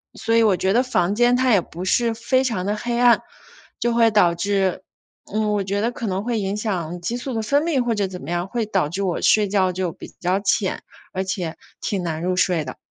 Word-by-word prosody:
所 230 Hz, -, 0 dB
以 230 Hz, -, +5 dB
我 200 Hz, -4 st, +3 dB
觉 190 Hz, +2 st, +1 dB
得 245 Hz, -, +4 dB
房 195 Hz, -7 st, +1 dB
间 240 Hz, +3 st, +4 dB
它 255 Hz, 0 st, +2 dB
也 200 Hz, -5 st, +5 dB
不 175 Hz, +3 st, -8 dB
是 235 Hz, +4 st, +2 dB
非 255 Hz, +3 st, +1 dB
常 225 Hz, -8 st, -2 dB
地 205 Hz, +1 st, 0 dB
黑 235 Hz, +2 st, -2 dB
暗， 245 Hz, -1 st, +5 dB, 0.6 s
就 240 Hz, 0 st, +1 dB
会 230 Hz, -1 st, +5 dB
导 180 Hz, -5 st, +4 dB
致， 190 Hz, +1 st, 0 dB, 0.5 s
嗯， 215 Hz, 0 st, 0 dB
我 205 Hz, -, 0 dB
觉 200 Hz, +1 st, -2 dB
得 235 Hz, +2 st, 0 dB
可 235 Hz, -2 st, -5 dB
能 195 Hz, +1 st, -2 dB
会 235 Hz, -2 st, -1 dB
影 195 Hz, 0 st, -2 dB
响 180 Hz, -6 st, -3 dB
激 235 Hz, +8 st, -2 dB
素 260 Hz, +1 st, -5 dB
的 225 Hz, -, 0 dB
分 285 Hz, +6 st, +2 dB
泌， 320 Hz, -5 st, +1 dB
或 235 Hz, -1 st, 0 dB
者 200 Hz, -2 st, 0 dB
怎 185 Hz, -1 st, -8 dB
么 140 Hz, -, -8 dB
样， 175 Hz, +2 st, -1 dB
会 235 Hz, 0 st, -2 dB
导 190 Hz, -7 st, 0 dB
致 195 Hz, +5 st, -3 dB
我 180 Hz, -3 st, -1 dB
睡 210 Hz, -2 st, +4 dB
觉 190 Hz, -2 st, +2 dB
就 180 Hz, -1 st, -2 dB
比 -, -, -11 dB
较 180 Hz, +2 st, +1 dB
浅， 195 Hz, -1 st, 0 dB, 0.3 s
而 190 Hz, +1 st, -1 dB
且 180 Hz, -4 st, -3 dB, 0.3 s
挺 200 Hz, -3 st, -2 dB
难 160 Hz, -2 st, -3 dB
入 180 Hz, 0 st, 0 dB
睡 175 Hz, -4 st, +1 dB
的。 130 Hz, -, -7 dB
200 Hz, 260 characters per minute, -22 LUFS, 185-230 Hz, 0.6 s, 以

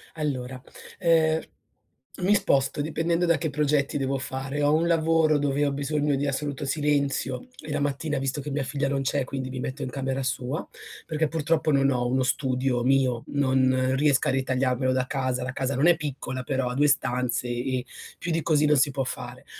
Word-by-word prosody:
Allora, 130 Hz, -5 st, -3 dB, 0.4 s
ehm, 160 Hz, -3 st, +3 dB, 0.8 s
mi 200 Hz, +3 st, +4 dB
sposto, 140 Hz, -6 st, +1 dB
dipendendo 165 Hz, +3 st, 0 dB
da 170 Hz, -1 st, +3 dB
che 160 Hz, -, -2 dB
progetti 145 Hz, -1 st, +1 dB
devo 135 Hz, 0 st, -1 dB
fare. 135 Hz, +2 st, -4 dB
Ho 145 Hz, +1 st, +3 dB
un 160 Hz, +2 st, +3 dB
lavoro 165 Hz, -2 st, +3 dB
dove 145 Hz, 0 st, +1 dB
ho 140 Hz, -, +1 dB
bisogno 145 Hz, +1 st, 0 dB
di 140 Hz, +1 st, -1 dB
assoluto 140 Hz, 0 st, -3 dB
silenzio 140 Hz, -3 st, 0 dB
e 155 Hz, -, -8 dB
la -, -, 0 dB
mattina 145 Hz, +1 st, -1 dB
visto 135 Hz, +2 st, -2 dB
che 145 Hz, +1 st, -6 dB
mia 140 Hz, 0 st, -1 dB
figlia 140 Hz, +1 st, -1 dB
non 140 Hz, 0 st, 0 dB
c'è, 140 Hz, +1 st, 0 dB
e -, -, 0 dB
quindi 130 Hz, 0 st, -5 dB
mi 130 Hz, -1 st, -5 dB
metto 130 Hz, +3 st, -5 dB
in 130 Hz, -, -3 dB
camera 135 Hz, 0 st, -2 dB
sua, 130 Hz, +3 st, -3 dB, 0.4 s
perché 155 Hz, -1 st, -1 dB
purtroppo 160 Hz, 0 st, +1 dB
non 140 Hz, -1 st, +3 dB
ho 125 Hz, -2 st, 0 dB
uno 130 Hz, +1 st, +1 dB
studio 130 Hz, -2 st, 0 dB
mio, 130 Hz, -2 st, +2 dB
non 130 Hz, -2 st, +2 dB
riesco 140 Hz, -1 st, +2 dB
a -, -, +3 dB
ritagliarmelo 130 Hz, -1 st, 0 dB
da 130 Hz, 0 st, 0 dB
casa, 130 Hz, -2 st, -1 dB
la 125 Hz, 0 st, -4 dB
casa 135 Hz, +1 st, -2 dB
non 140 Hz, +6 st, +3 dB
è 175 Hz, -, +6 dB
piccola 130 Hz, -4 st, -5 dB
però, 135 Hz, -1 st, -1 dB
ha -, -, -3 dB
2 145 Hz, +2 st, +4 dB
stanze 125 Hz, -4 st, 0 dB
e 125 Hz, +1 st, -2 dB, 0.3 s
più 170 Hz, -, -4 dB
di 165 Hz, 0 st, +1 dB
così 150 Hz, -2 st, +2 dB
non 150 Hz, 0 st, +4 dB
si 140 Hz, +2 st, +3 dB
può 135 Hz, -1 st, -2 dB
fare. -, -, -7 dB
140 Hz, 200 wpm, -26 LUFS, 130-150 Hz, 0.8 s, è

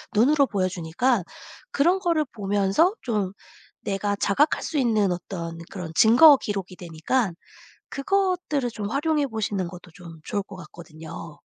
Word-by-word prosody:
눈으로 280 Hz, +6 st, +4 dB
보여 190 Hz, -5 st, 0 dB
주니까 185 Hz, +7 st, 0 dB, 0.5 s
그런 350 Hz, +7 st, +2 dB
거를 335 Hz, -4 st, +1 dB
보면서 205 Hz, -, +1 dB
좀 210 Hz, -6 st, -2 dB, 0.5 s
내가 200 Hz, +1 st, -2 dB
자각할 270 Hz, +10 st, +1 dB
수 315 Hz, -, -3 dB
있는 215 Hz, -7 st, +2 dB
어떤 170 Hz, -2 st, -5 dB
그런 180 Hz, -4 st, -7 dB
증거 270 Hz, -, +7 dB
기록이 195 Hz, -5 st, -5 dB
되니까 175 Hz, +6 st, -1 dB, 0.6 s
그것들을 355 Hz, -5 st, 0 dB
좀 205 Hz, -2 st, -5 dB
활용해 295 Hz, +1 st, +1 dB
보시는 205 Hz, -6 st, -3 dB
것도 180 Hz, 0 st, -12 dB
좀 170 Hz, -2 st, -12 dB
좋을 205 Hz, -1 st, -2 dB
것 195 Hz, -1 st, -12 dB
같거든요. 160 Hz, -3 st, -11 dB
205 Hz, 295 characters per minute, -24 LUFS, 185-280 Hz, 0.6 s, 증거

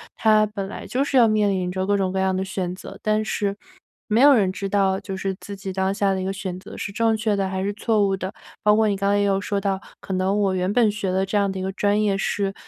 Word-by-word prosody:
它 215 Hz, -1 st, +4 dB
本 200 Hz, -2 st, -5 dB
来 200 Hz, -, -8 dB
就 260 Hz, +2 st, 0 dB
是 280 Hz, -, -3 dB
要 235 Hz, -2 st, +7 dB
面 210 Hz, -2 st, +2 dB
临 185 Hz, -2 st, -1 dB
着 185 Hz, +1 st, -2 dB
各 205 Hz, +1 st, +2 dB
种 190 Hz, -2 st, 0 dB
各 190 Hz, -, -3 dB
样 190 Hz, 0 st, +1 dB
的 190 Hz, -, -1 dB
选 185 Hz, -2 st, -3 dB
择， -, -, -10 dB
但 215 Hz, 0 st, +1 dB
是 200 Hz, -2 st, -1 dB, 0.6 s
没 225 Hz, +3 st, +4 dB
有 285 Hz, +1 st, +8 dB
人 200 Hz, -7 st, +3 dB
知 195 Hz, +1 st, -4 dB
道 195 Hz, -1 st, +1 dB
就 195 Hz, -, -6 dB
是 190 Hz, 0 st, -3 dB
自 200 Hz, -, -8 dB
己 195 Hz, 0 st, -6 dB
当 190 Hz, +1 st, 0 dB
下 200 Hz, -1 st, +1 dB
的 -, -, -2 dB
一 -, -, -3 dB
个 195 Hz, -, -2 dB
选 185 Hz, -2 st, -5 dB
择 -, -, -11 dB
是 200 Hz, -, -5 dB
正 225 Hz, +2 st, +1 dB
确 215 Hz, -1 st, 0 dB
的 195 Hz, -1 st, 0 dB
还 190 Hz, 0 st, -3 dB
是 200 Hz, -, 0 dB
错 215 Hz, -1 st, +1 dB
误 195 Hz, 0 st, 0 dB
的。 190 Hz, 0 st, -5 dB, 0.3 s
包 210 Hz, 0 st, +5 dB
括 220 Hz, 0 st, +3 dB
你 205 Hz, -, +1 dB
刚 200 Hz, +1 st, +1 dB
才 205 Hz, -, +2 dB
也 -, -, +2 dB
有 195 Hz, -1 st, +2 dB
说 200 Hz, 0 st, -2 dB
到， 195 Hz, -1 st, -1 dB, 0.2 s
可 195 Hz, -, -5 dB
能 190 Hz, +2 st, +1 dB
我 195 Hz, -2 st, +1 dB
原 185 Hz, +1 st, 0 dB
本 230 Hz, -3 st, +4 dB
学 205 Hz, -2 st, -3 dB
的 190 Hz, +1 st, +1 dB
这 200 Hz, +2 st, -1 dB
样 200 Hz, -1 st, +2 dB
的 190 Hz, -, -5 dB
一 -, -, -3 dB
个 190 Hz, -, -2 dB
专 205 Hz, +2 st, +1 dB
业 200 Hz, -2 st, +1 dB
是 195 Hz, 0 st, -1 dB
195 Hz, 315 characters per minute, -23 LUFS, 190-210 Hz, 0.6 s, 有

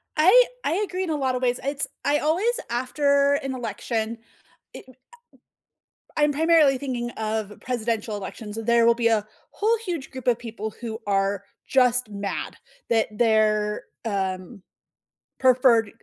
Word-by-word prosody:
I 380 Hz, +11 st, +7 dB, 0.2 s
I -, -, 0 dB
agree 375 Hz, 0 st, -3 dB
in 360 Hz, -, -4 dB
a 315 Hz, -, 0 dB
lotta 260 Hz, -3 st, 0 dB
ways. 250 Hz, -1 st, 0 dB
It's 275 Hz, +1 st, -2 dB, 0.2 s
I 290 Hz, +1 st, +3 dB
always 400 Hz, +11 st, +1 dB
after 280 Hz, +3 st, +2 dB
an 270 Hz, -1 st, -3 dB
election, 225 Hz, 0 st, -3 dB, 0.5 s
it -, -, -10 dB
eh 255 Hz, -, -15 dB, 1.2 s
I'm 295 Hz, -1 st, +3 dB
primarily 310 Hz, -2 st, +4 dB
thinking 250 Hz, -3 st, -3 dB
of 215 Hz, -2 st, -3 dB
presidential 225 Hz, -3 st, -2 dB
elections. 210 Hz, +2 st, -7 dB
There 235 Hz, +1 st, +3 dB
will 235 Hz, 0 st, +5 dB
be 235 Hz, -1 st, 0 dB
a 220 Hz, -2 st, +3 dB, 0.3 s
whole 445 Hz, +2 st, +1 dB
huge 335 Hz, -7 st, -4 dB
group 260 Hz, -2 st, -9 dB
of 240 Hz, -2 st, +3 dB
people 220 Hz, -2 st, -6 dB
who 225 Hz, -2 st, -5 dB
are 195 Hz, 0 st, 0 dB, 0.2 s
just 250 Hz, -3 st, +3 dB
mad 200 Hz, -1 st, -4 dB, 0.3 s
that 225 Hz, -1 st, +3 dB
their, 215 Hz, -2 st, +2 dB, 0.2 s
um, 190 Hz, 0 st, -3 dB, 0.8 s
preferred, 250 Hz, -4 st, +4 dB
240 Hz, 140 wpm, -24 LUFS, 220-280 Hz, 1.2 s, I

